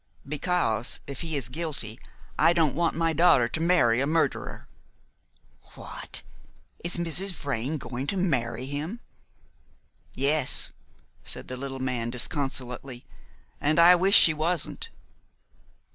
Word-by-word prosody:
"Because 145 - 0
if 140 -2 -7
he 160 -3 -2
is 135 - -3
guilty, 135 -6 -5 0.4
I 170 - +5
don't 160 -5 +2
want 170 +2 0
my 165 0 +1
daughter 155 -7 +4
to - - -4
marry 130 -9 +3
a 140 - 0
murderer." 160 +2 -1 1.1
"What! - - -5 0.6
Is 175 +1 -1
Mrs. 175 +3 +1
Vrain 140 -1 -3
going 130 0 -6
to 195 - -1
marry 125 -9 -1
him?" 150 - -5 1.2
"Yes," 140 0 +3 0.5
said - - -7
the 130 - -4
little 135 +1 -6
man 125 -3 -2
disconsolately, 125 -1 -4 0.6
"and 155 +3 +1
I 170 +1 +8
wish 190 +3 +4
she 160 - +7
wasn't." 160 +2 0
145 Hz, 125 wpm, -26 LUFS, 130-170 Hz, 1.2 s, I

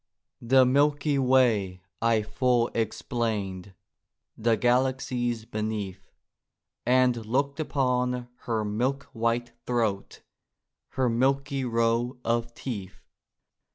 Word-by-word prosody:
The 130 +2 +5
milky 145 +2 +2
way 115 -9 +2 0.2
I 115 -1 +3
full 120 +1 +1
explained; 105 -4 -2 0.6
The 115 0 +1
galaxies 125 -2 0
beneath; 105 -4 -4 0.8
And 125 -2 +3
looked 140 +6 -1
upon 125 -4 0 0.2
her 110 -2 0
milk 125 +7 -1
white 115 +1 -1 0.2
throat, 110 -5 -1 0.7
Her 130 -1 +1
milky 135 +3 +1
row 115 +2 +1
of 115 0 -1
teeth. 100 -7 -6
120 Hz, 90 wpm, -27 LUFS, 110-130 Hz, 0.8 s, The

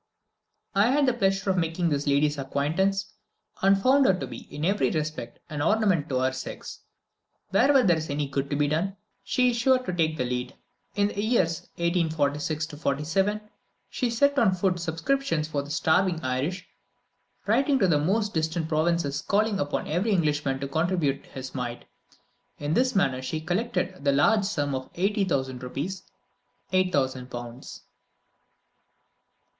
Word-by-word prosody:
I 200 +2 +4
had 285 +2 +3
the 255 - +3
pleasure 195 -3 +1
of 185 - +1
making 165 +1 0
this 145 -1 -1
lady's 145 +1 +2
acquaintance, 160 +9 -1 0.5
and 195 0 +4
found 265 +6 +4
her 190 - +4
to 185 - -4
be, - - -8
in 150 +2 -3
every 200 +3 +2
respect, 155 -1 -4
an 150 -1 -4
ornament 185 -3 +2
to 130 - 0
her 130 0 +2
sex. 130 0 -7 0.7
Wherever 260 +6 +5
there 175 -4 +4
is 160 0 -5
any 145 0 -1
good 140 0 -2
to 145 - -1
be 145 0 +2
done, 175 +7 -1 0.3
she 250 -1 +2
is 235 - -3
sure 260 +2 +4
to 255 -8 -4
take 160 -2 0
the 125 - 0
lead. 125 0 -3 0.4
In 205 0 +2
the 205 - -3
years 205 -8 +1
1846 160 -3 0 0.4
7, 205 +4 +1 0.5
she 250 - -1
set 280 +5 +2
on 195 -5 +3
foot 180 -1 0
subscriptions 170 - -1
for 145 -2 -2
the 140 - -10
starving 165 +3 +2
Irish, 140 +9 -2 0.8
writing 270 +6 +3
to 195 - +3
the 155 -4 +3
most 205 +7 0
distant 160 0 -1
provinces 155 -2 0
and - - -23
calling 210 0 +2
upon 145 -2 -2
every 180 +8 0
Englishman 150 -7 +1
to 140 - -2
contribute 160 -2 0
his 130 -1 -8
mite. 120 -2 -5 0.7
In 145 +1 -2
this 255 +4 +2
manner 135 -9 +2
she 155 +5 -3
collected 180 -2 -2
the 140 - +3
large 205 +9 +3
sum 145 -8 -1
of 130 0 -4
80,000 175 - 0
rupees 145 +9 -5 0.6
(8,000 135 -9 +1
pounds.) 120 0 -8
165 Hz, 160 wpm, -26 LUFS, 145-195 Hz, 0.8 s, Wherever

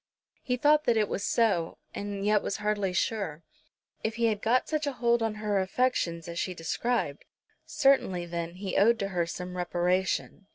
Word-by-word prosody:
He 250 -2 -1
thought 300 +3 +4
that 235 -2 +3
it 210 -1 +2
was 200 - -3
so, 200 -9 +1 0.2
and 200 -1 -4
yet 210 0 +3
was - - -3
hardly 210 -2 0
sure. 180 -4 -2 0.6
If 220 0 -1
he 235 0 +1
had 210 -1 -2
got 245 +3 +2
such 310 -1 -1
a 285 - -1
hold 235 -1 +2
on 225 -1 0
her 210 -2 0
affections 190 -5 0
as 170 0 -4
she 185 - -2
described, 165 -1 -1 0.4
certainly, 270 - +2
then, 170 0 -4
he 190 +1 -3
owed 230 +4 +5
to 195 -2 -2
her 175 -3 -1
some 180 +1 -6
reparation. 180 +2 -1
205 Hz, 180 wpm, -28 LUFS, 180-235 Hz, 0.6 s, owed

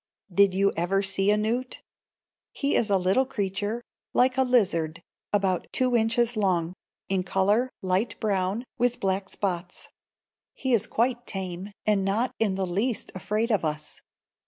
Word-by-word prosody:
Did 200 0 +4
you 200 +1 +3
ever 190 +4 +1
see 195 +1 +1
a 210 - +4
newt? 235 +4 -2 0.7
He 280 0 0
is 225 - +2
a 200 - +4
little 190 +8 +2
creature, 205 +2 -2 0.3
like 250 0 +4
a 265 - +3
lizard, 175 -10 +1 0.3
about 195 -3 +1
two 255 -2 +2
inches 235 +1 +2
long; 180 -5 +1 0.3
in 190 -1 +1
color, 200 +7 +2
light 185 +5 0
brown, 200 +1 0 0.2
with 245 0 +1
black 190 0 -1
spots. 180 -2 -4 0.7
He 260 -2 -1
is 225 - +2
quite 240 +1 0
tame, 190 0 -5
and 210 -2 +2
not 215 +6 0
in 205 -4 +1
the 190 0 -1
least 205 +7 -1
afraid 215 +5 -1
of 205 -5 +2
us. 150 -1 -3
200 Hz, 155 wpm, -26 LUFS, 185-235 Hz, 0.7 s, Did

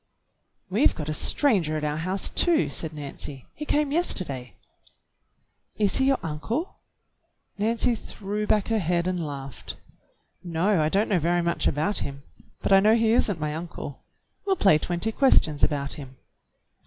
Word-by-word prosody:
"We've 210 +9 +2
got 150 -1 -5
a - - -1
stranger 175 - +2
at 155 - -5
our 150 0 -1
house, 185 +4 -1
too," 340 -3 +2
said 160 - -3
Nancy. 140 -2 -7
"He 300 - -7
came 295 -1 +1
yesterday." 140 - -1 1.2
"Is 205 -2 +2
he 265 - +3
your 270 0 +3
uncle.^" 220 - -3 0.9
Nancy 230 +3 +1
threw 210 -1 -5
back 210 0 +1
her 225 -1 +2
head 175 -1 0
and 180 -2 -1
laughed. 140 -3 -7 0.7
"No, 175 +2 +1
I 155 - +2
don't 200 +6 +1
know 195 -4 +2
very 170 +2 +1
much 170 0 0
about 175 +9 +1
him, 140 0 -6 0.4
but - - +2
I 195 - +8
know 215 +3 +5
he 225 -1 +2
is 230 - +4
n't 190 -5 -2
my 150 0 -2
uncle. 165 -4 -7 0.4
We'll 390 -1 +1
play 195 - +4
twenty 175 +7 0
questions 170 - +3
about 140 -2 +1
him." 135 -3 -7
175 Hz, 165 wpm, -25 LUFS, 150-220 Hz, 1.2 s, I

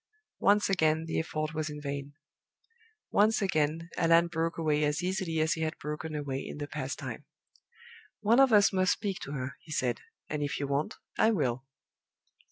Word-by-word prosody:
Once 205 +1 +4
again 160 -4 +2
the 165 - -1
effort 155 -1 -3
was 155 0 -2
in 150 0 -6
vain. 140 -1 -5 1.0
Once 215 +2 +4
again 165 -4 0
Allan 170 0 +5
broke 165 0 -1
away 150 -2 +1
as 150 +3 0
easily 185 -3 -1
as 160 +1 +2
he 160 - -4
had 160 0 -2
broken 150 +1 -5
away 140 -3 -3
in - - -7
the 145 - -3
past 140 -2 -4
time. - - -6 1.0
"One 225 +4 +4
of 270 -2 +6
us 205 -2 +6
must 185 -1 +3
speak 195 -3 -3
to 140 - -6
her," 130 -1 -4
he 160 - -14
said. 125 -5 0 0.3
"And 150 -1 -3
if 145 -1 -2
you 140 - -1
won't, 140 +2 -1 0.2
I 220 - +6
will." 135 - 0
155 Hz, 180 wpm, -30 LUFS, 145-180 Hz, 1.0 s, of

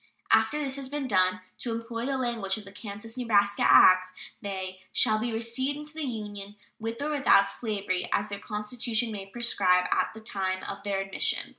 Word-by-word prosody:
After 300 - +4
this 275 -2 -2
has 270 -2 -5
been 290 -1 -3
done, 185 -3 +2 0.2
to 240 - -3
employ 230 +1 -4
the 275 -1 0
language 230 -6 -1
of 215 - -9
the 195 - -11
Kansas 205 +3 -8
and 250 -2 -4
Nebraska 205 -2 +3
act, 185 0 +7 0.3
they 190 -2 -5
"shall 215 0 +3
be 235 +2 -2
received 235 +5 -1
into 300 +1 -8
the 315 - -5
Union 205 -3 -6 0.2
with 225 +4 -4
or 305 - -1
without 275 -9 +5
slavery, 200 -4 -3
as 205 - +1
their 200 -1 -5
constitution 220 +2 -1
may 195 -2 -6
prescribe 190 -5 +2
at - - +2
the - - -8
time 190 -4 -2
of - - -6
their 200 -1 -1
admission." 195 - -1
215 Hz, 190 wpm, -28 LUFS, 195-240 Hz, 0.3 s, act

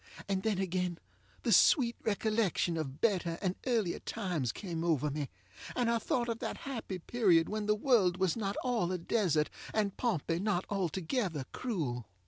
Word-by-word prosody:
And 195 -1 0
then 215 -1 0
again 180 -2 -1 0.5
the - - +1
sweet 240 -6 +5
recollection 215 -5 +1
of 145 -3 -4
better 180 -7 +1
and 185 -3 0
earlier 220 -8 +1
times 175 - -2
came 170 -5 -4
over 150 -4 +1
me, 145 -1 -3 0.5
and 240 -2 +2
I 230 - +2
thought 240 +1 0
of 230 -1 -2
that - - -3
happy 230 -8 -4
period 180 -4 +3
when 215 0 -3
the 210 - +4
world 210 -7 +3
was 185 -3 +1
not 200 -3 -2
all 235 -8 +1
a 185 - 0
desert, 170 -4 +1 0.2
and 205 -3 +1
Pompey 170 - 0
not 195 -2 0
altogether 185 - -1
cruel. 140 - -3
190 Hz, 165 wpm, -32 LUFS, 170-220 Hz, 0.5 s, sweet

